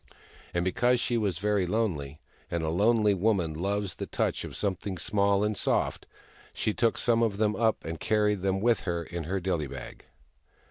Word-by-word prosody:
And 85 0 -1
because 120 +7 +2
she 120 - 0
was 100 -7 0
very 100 -1 +1
lonely, 85 -9 -1 0.3
and 85 -1 -2
a 80 - 0
lonely 105 +4 +3
woman 95 -4 +1
loves 100 +4 -2
the - - -6
touch - - -1
of - - -7
something 95 -1 -2
small 100 +1 +2
and 105 0 0
soft, - - 0 0.5
she 105 - 0
took 115 +1 +1
some 115 -1 +2
of 110 -4 +1
them 105 0 +1
up 115 -1 +1
and 80 0 -5
carried 105 -2 +1
them 95 0 0
with 120 0 +3
her 85 -2 -2
in 85 0 -6
her 95 +4 -1
dilly 85 -5 -1
bag. 65 -2 -9
100 Hz, 185 wpm, -28 LUFS, 85-105 Hz, 0.5 s, lonely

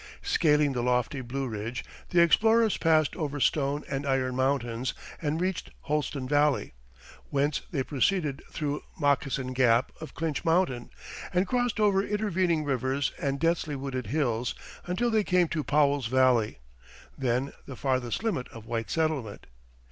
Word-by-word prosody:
Scaling 150 - +3
the 125 - -1
lofty 125 +2 0
Blue 130 +2 -3
Ridge, 115 +2 -4 0.2
the 170 -1 +5
explorers 220 +6 +4
passed 155 -2 +2
over 145 -4 -3
Stone 145 +1 +1
and 140 0 -3
Iron 130 -2 0
Mountains 130 -2 0 0.3
and 155 0 -1
reached 185 0 -2
Holston 145 -3 -2
Valley, 145 - +2 0.6
whence 145 +1 +1
they 135 -5 -1
proceeded 150 +1 0
through 145 -1 -3 0.2
Moccasin 135 -3 +1
Gap 125 -1 +3
of 160 - -8
Clinch 160 -3 -2
Mountain, 160 -8 +1 0.4
and 180 +1 +2
crossed 245 0 0
over 200 -2 +4
intervening 190 -6 0
rivers 135 0 0
and 140 -1 -1
densely 165 -2 0
wooded 130 -4 -4
hills 120 -3 0 0.3
until 230 +7 0
they 220 -1 +3
came 180 -3 +3
to 155 -3 -2
Powell's 145 -3 +2
Valley, 125 -3 +3 0.6
then 130 +1 -1
the 130 - -7
farthest 130 - -1
limit 200 - -1
of 115 -1 -12
white 115 -1 -3
settlement. 155 -10 -1
140 Hz, 145 wpm, -28 LUFS, 130-165 Hz, 0.6 s, the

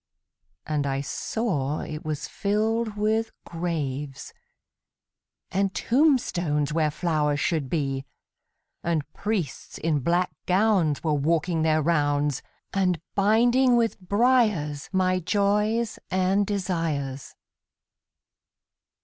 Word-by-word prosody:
And 150 -2 -1
I 135 0 -1
saw 150 - -2
it 155 0 -6
was 155 -2 -3
filled 215 +1 -1
with 220 +2 +1 0.2
graves, 145 -5 -4 1.2
And 195 +1 0
tombstones 175 - +2
where 155 -1 +2
flowers 150 -2 0
should 155 -5 0
be; 135 -3 -1 0.8
And 165 -3 0
priests 200 - -3
in 155 -2 0
black 175 +6 +1 0.2
gowns 185 -6 +2
were 155 -2 +1
walking 160 +3 +1
their 155 -1 +2
rounds, 145 -4 +1 0.3
And 185 -3 +1
binding 240 +5 +4
with 230 -3 +1
briars 200 - +1
my 185 -1 +2
joys 210 +4 +1
and 190 +2 +2
desires. 165 -9 -2
175 Hz, 100 wpm, -25 LUFS, 150-210 Hz, 1.2 s, binding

